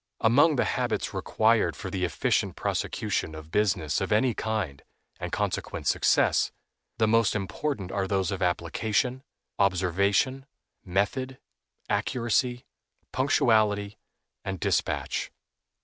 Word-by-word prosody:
Among 145 Hz, +7 st, +5 dB
the 125 Hz, -, +2 dB
habits -, -, -1 dB
required 110 Hz, 0 st, +2 dB
for 95 Hz, -3 st, -6 dB
the 95 Hz, -1 st, -2 dB
efficient 85 Hz, -, 0 dB
prosecution 80 Hz, -, -2 dB
of 80 Hz, 0 st, -10 dB
business 90 Hz, -8 st, +1 dB
of -, -, -2 dB
any 115 Hz, +4 st, +3 dB
kind, 105 Hz, -13 st, -3 dB, 0.4 s
and -, -, -5 dB
consequent -, -, -2 dB
success, -, -, +3 dB, 0.5 s
the 110 Hz, -, +3 dB
most 115 Hz, -2 st, +3 dB
important 100 Hz, +1 st, -3 dB
are 95 Hz, -1 st, -1 dB
those 95 Hz, 0 st, 0 dB
of 95 Hz, -, -4 dB
application, 105 Hz, +8 st, 0 dB, 0.4 s
observation, 100 Hz, +8 st, +1 dB, 0.4 s
method, 105 Hz, +8 st, -1 dB, 0.5 s
accuracy, 120 Hz, +1 st, 0 dB, 0.5 s
punctuality, 110 Hz, -6 st, +2 dB, 0.4 s
and 95 Hz, -1 st, -4 dB
dispatch. -, -, -1 dB
105 Hz, 110 wpm, -27 LUFS, 95-120 Hz, 0.5 s, Among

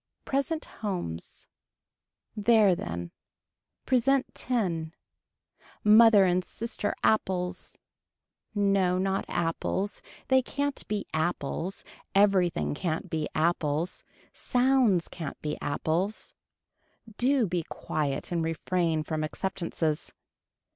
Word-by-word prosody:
Present 295 Hz, +4 st, -1 dB, 0.2 s
Homes. 175 Hz, -, -4 dB, 0.9 s
There 210 Hz, -2 st, +5 dB
then. 85 Hz, -, -5 dB, 0.7 s
Present 265 Hz, +1 st, +2 dB
ten. 175 Hz, -9 st, -2 dB, 0.9 s
Mother 215 Hz, -1 st, +7 dB
and 180 Hz, 0 st, +2 dB
sister 220 Hz, 0 st, -3 dB
apples, 185 Hz, -4 st, 0 dB, 0.8 s
no 195 Hz, -3 st, +2 dB
not 195 Hz, +1 st, 0 dB
apples, 175 Hz, +4 st, -1 dB, 0.3 s
they 260 Hz, 0 st, +5 dB
can't 285 Hz, +2 st, -2 dB
be 210 Hz, -1 st, -2 dB
apples, 165 Hz, +3 st, -2 dB, 0.3 s
everything 195 Hz, -6 st, +3 dB
can't 160 Hz, +1 st, -3 dB
be 155 Hz, -2 st, -1 dB
apples, 160 Hz, +1 st, 0 dB, 0.3 s
sounds 245 Hz, -8 st, +2 dB
can't 160 Hz, -5 st, -7 dB
be 150 Hz, 0 st, -3 dB
apples. 170 Hz, +8 st, -1 dB, 0.9 s
Do 260 Hz, -1 st, +3 dB
be 180 Hz, -2 st, -1 dB
quiet 150 Hz, -2 st, -3 dB
and 170 Hz, -2 st, 0 dB
refrain 165 Hz, 0 st, 0 dB
from 155 Hz, 0 st, -2 dB
acceptances. 165 Hz, -2 st, -2 dB
185 Hz, 90 wpm, -28 LUFS, 160-215 Hz, 0.9 s, Mother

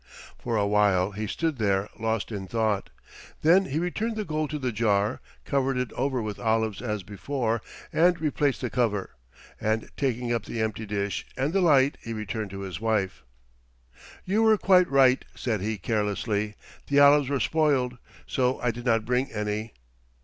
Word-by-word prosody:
For 120 Hz, -2 st, -2 dB
a 100 Hz, -, +2 dB
while 100 Hz, -2 st, +3 dB
he 105 Hz, +2 st, -4 dB
stood 160 Hz, +2 st, -2 dB
there 100 Hz, -2 st, +1 dB
lost 110 Hz, 0 st, -1 dB
in 100 Hz, -3 st, -5 dB
thought. 110 Hz, -2 st, 0 dB, 0.5 s
Then 180 Hz, +5 st, +5 dB
he 145 Hz, -, -3 dB
returned 210 Hz, +7 st, -1 dB
the 215 Hz, -1 st, -3 dB
gold 155 Hz, -2 st, -2 dB
to 150 Hz, -, -3 dB
the 130 Hz, -3 st, -2 dB
jar, 105 Hz, -2 st, +1 dB, 0.2 s
covered 135 Hz, -1 st, 0 dB
it 125 Hz, -1 st, -2 dB
over 130 Hz, -2 st, -1 dB
with 105 Hz, -2 st, -5 dB
olives 110 Hz, -2 st, 0 dB
as 105 Hz, -5 st, -3 dB
before, 115 Hz, +3 st, -2 dB, 0.3 s
and 175 Hz, +1 st, +4 dB
replaced 145 Hz, -3 st, 0 dB
the 125 Hz, -, -3 dB
cover, 105 Hz, -6 st, 0 dB, 0.5 s
and 110 Hz, +1 st, -1 dB
taking 125 Hz, -3 st, -1 dB
up 115 Hz, -3 st, -2 dB
the 115 Hz, -, -5 dB
empty 110 Hz, 0 st, -2 dB
dish 100 Hz, -1 st, -2 dB
and 135 Hz, +5 st, 0 dB
the 195 Hz, -, +3 dB
light 145 Hz, -5 st, +4 dB
he 115 Hz, -, -5 dB
returned 110 Hz, -1 st, -4 dB
to 95 Hz, +1 st, -7 dB
his 95 Hz, -1 st, -6 dB
wife. 105 Hz, -6 st, 0 dB, 1.0 s
"You 205 Hz, +4 st, +1 dB
were 220 Hz, -1 st, +5 dB
quite 185 Hz, -3 st, +4 dB
right," 135 Hz, -2 st, +4 dB
said 110 Hz, -6 st, -2 dB
he 110 Hz, +2 st, -2 dB
carelessly. 105 Hz, +1 st, -1 dB, 0.3 s
"The 140 Hz, 0 st, +3 dB
olives 145 Hz, -1 st, +6 dB
were 140 Hz, -1 st, 0 dB
spoiled, 135 Hz, -6 st, +1 dB, 0.3 s
so 130 Hz, 0 st, 0 dB
I 125 Hz, -, +1 dB
did 120 Hz, +2 st, -9 dB
not 115 Hz, -2 st, +2 dB
bring 125 Hz, +3 st, 0 dB
any." 105 Hz, +1 st, -3 dB
115 Hz, 175 wpm, -26 LUFS, 105-140 Hz, 1.0 s, olives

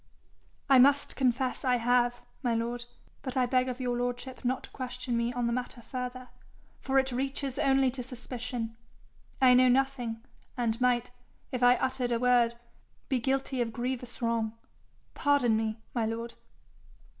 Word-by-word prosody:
'I 270 Hz, -2 st, +7 dB
must 280 Hz, +2 st, +4 dB
confess 255 Hz, 0 st, 0 dB
I 255 Hz, -2 st, +3 dB
have, 245 Hz, 0 st, +2 dB, 0.2 s
my 240 Hz, -4 st, +1 dB
lord; 240 Hz, +1 st, -2 dB, 0.4 s
but 260 Hz, -1 st, -4 dB
I 255 Hz, -, +4 dB
beg 255 Hz, +1 st, +2 dB
of 250 Hz, 0 st, -5 dB
your 245 Hz, -1 st, -1 dB
lordship 245 Hz, +1 st, -3 dB
not 255 Hz, +1 st, 0 dB
to -, -, -9 dB
question 250 Hz, -1 st, -4 dB
me 235 Hz, +1 st, 0 dB
on 245 Hz, -1 st, -1 dB
the 235 Hz, -, +1 dB
matter 245 Hz, -1 st, -4 dB
further, 250 Hz, 0 st, -5 dB, 0.5 s
for 270 Hz, 0 st, 0 dB
it 265 Hz, 0 st, +3 dB
reaches 270 Hz, +1 st, -2 dB
only 270 Hz, -1 st, +3 dB
to 255 Hz, 0 st, -5 dB
suspicion. 245 Hz, -2 st, -5 dB, 0.6 s
I 255 Hz, -1 st, +7 dB
know 255 Hz, +1 st, +6 dB
nothing, 250 Hz, -3 st, 0 dB, 0.3 s
and 235 Hz, -1 st, -1 dB
might, 245 Hz, -1 st, +2 dB, 0.4 s
if 255 Hz, -2 st, -3 dB
I 245 Hz, 0 st, +7 dB
uttered 255 Hz, -2 st, -1 dB
a 235 Hz, -, +2 dB
word, 240 Hz, -1 st, +3 dB, 0.5 s
be 260 Hz, -3 st, +2 dB
guilty 265 Hz, +1 st, 0 dB
of 230 Hz, -1 st, -1 dB
grievous 245 Hz, +1 st, -4 dB
wrong. 230 Hz, -1 st, 0 dB, 0.6 s
Pardon 285 Hz, -6 st, +3 dB
me, 220 Hz, 0 st, -1 dB, 0.2 s
my 230 Hz, -3 st, 0 dB
lord.' 230 Hz, +1 st, -4 dB
250 Hz, 160 wpm, -29 LUFS, 235-260 Hz, 0.6 s, I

